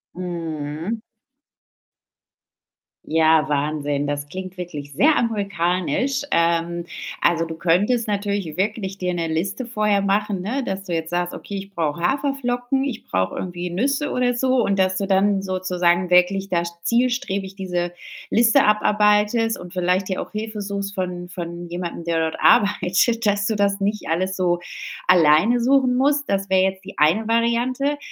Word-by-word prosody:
Mhm. 165 +2 -4 2.1
Ja, 160 0 +3
Wahnsinn, 145 -1 -1
das 145 0 -3
klingt 185 +1 -7
wirklich 150 -5 -7
sehr 300 - +4
amerikanisch. 200 - 0
Ähm, 170 0 +1 0.4
also, 165 -1 +2
du 165 - -6
könntest 205 +9 +1
natürlich 200 -5 -2
wirklich 195 0 -2
dir 180 -2 -2
'ne 170 -1 -2
Liste 190 +10 -2
vorher 210 -3 +1
machen, 200 -1 0
ne, 250 +9 -2
dass 195 -3 -4
du 175 - -4
jetzt 165 0 -3
sagst: 175 0 -1
„Okay, 200 - -7
ich 195 0 -8
brauche 165 -1 -2
Haferflocken, 265 +3 0
ich 265 -5 -4
brauche 95 0 -1
irgendwie 180 -1 -4
Nüsse“ 275 - 0
oder 250 0 +1
so. 255 +2 +1
und, 200 -1 0
dass 185 0 +2
du 200 - -1
dann 195 0 +2
sozusagen 180 -2 0
wirklich 190 +2 +3
da 170 -2 +1 0.2
zielstrebig 235 -3 0
diese 180 -2 -2 0.4
Liste 235 +4 +5
abarbeitest 210 +2 +2
und 180 0 -10
vielleicht 180 +1 +1
dir 185 - -2
auch - - -8
Hilfe 215 0 -5
suchst 200 0 -4
von 180 -1 -4
von 175 -1 -6
jemandem, 175 -1 -5
der 170 -1 0
dort - - -8
arbeitet, 205 +4 +3
dass 205 0 +1
du 220 - 0
das 200 0 +1
nicht 205 +1 -2
alles 185 +3 0
so 175 -2 +1 0.5
alleine 180 +7 +5
suchen 255 0 +3
musst. 285 +2 +2
Das 195 0 -1
wär 190 0 +4
jetzt 190 0 -1
die 200 - -10
eine 170 +9 +3
Variante. 240 +5 +1
190 Hz, 155 wpm, -22 LUFS, 175-220 Hz, 2.1 s, Liste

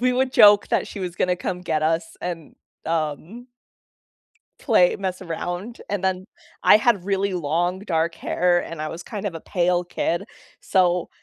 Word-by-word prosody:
we 250 0 +2
would 260 0 +1
joke 205 0 +7
that - - 0
she - - -8
was 180 -3 -4
gonna 180 -1 0
come 180 0 -4
get 155 -3 -1
us 165 +1 -1
and, 170 -3 -6 0.3
um 165 - -3 1.1
play 200 -9 +4
mess 190 -1 -4
around. 175 +6 -5
And 200 -2 -2
then 190 0 -1 0.4
I - - +7
had 215 -4 +2
really 195 0 0
long 175 +3 -1
dark 165 -4 -1
hair 175 0 +1
and 165 -2 -7
I 155 - -3
was 165 +2 -7
kind 205 +3 -6
of 180 - -4
a 165 - -6
pale 180 0 0
kid. 175 -1 -2 0.4
So 180 -2 +1
180 Hz, 170 wpm, -23 LUFS, 165-200 Hz, 1.1 s, joke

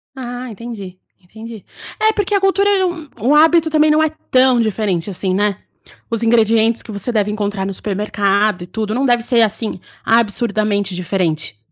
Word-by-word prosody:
Ah, 245 -1 -6
entendi, 210 -5 -8 0.2
entendi. 220 +3 -11 0.3
É, 435 0 +3
porque 415 -1 -2
a 400 - +4
cultura 390 +1 +2
é 385 -2 +2
um 330 -5 -5
um 275 +6 +3
hábito 320 +1 +5
também 305 0 +3
não 305 +1 +3
é 315 - +2 0.2
tão 255 -1 +4
diferente, 210 -4 -1
assim, 185 0 -2
né. 205 0 0 0.5
Os 230 0 -2
ingredientes 225 0 +3
que 225 - -10
você 205 +4 -4
deve 210 -2 0
encontrar 205 -2 -2
no 195 - -3
supermercado 200 -1 0
e - - -10
tudo, 215 +3 -3
não 270 - 0
deve 240 -2 +3
ser, 240 -2 +2
assim, 220 -1 -1 0.3
absurdamente 210 -3 +1
diferente. 165 - -2
220 Hz, 175 wpm, -17 LUFS, 200-255 Hz, 0.5 s, hábito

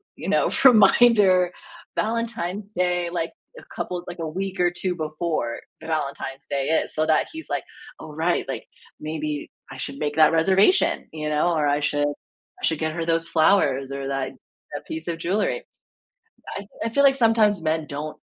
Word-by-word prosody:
you - - -7
know, - - +3 0.2
reminder: 205 -5 +6 0.4
"Valentine's 215 -3 -2
Day." 180 -1 0
Like, 165 -2 -2 0.3
a - - -13
couple 180 -1 -4
like, 175 - -7
a 160 - -3
week 190 +4 -4
or 175 -1 +3
2 180 0 -2
before 155 -6 -2 0.2
Valentine's 140 -3 -4
Day 140 0 -1
is - - -6
so 155 0 +1
that 155 - +2
he's, 320 0 -8
like, - - -1 0.4
"Oh, - - -9
right. - - 0
Like, - - -5 0.3
maybe 155 -1 -4 0.2
I 135 - -8
should 140 +1 -5
make 150 -1 -2
that 155 -1 +6
reservation." 190 - +3
You 155 -1 -3
know, 150 +3 +2
or, 150 -2 +1
"I 145 0 +2
should 145 0 +1
I 145 - -9
should 160 -2 +1
get 155 -1 -1
her 165 0 -3
those 165 0 +2
flowers 150 -6 +2
or 140 0 -4
that 135 -1 -2 0.4
that - - -6
piece 160 +1 -6
of 170 -1 -2
jewelry." 215 - -1 0.9
I - - -4
f - - -12 0.2
I - - 0
feel 280 +5 +2
like 275 -1 +6
sometimes 225 -6 +3
men 155 0 0
don't 150 +2 -5
165 Hz, 180 wpm, -24 LUFS, 150-195 Hz, 0.9 s, reminder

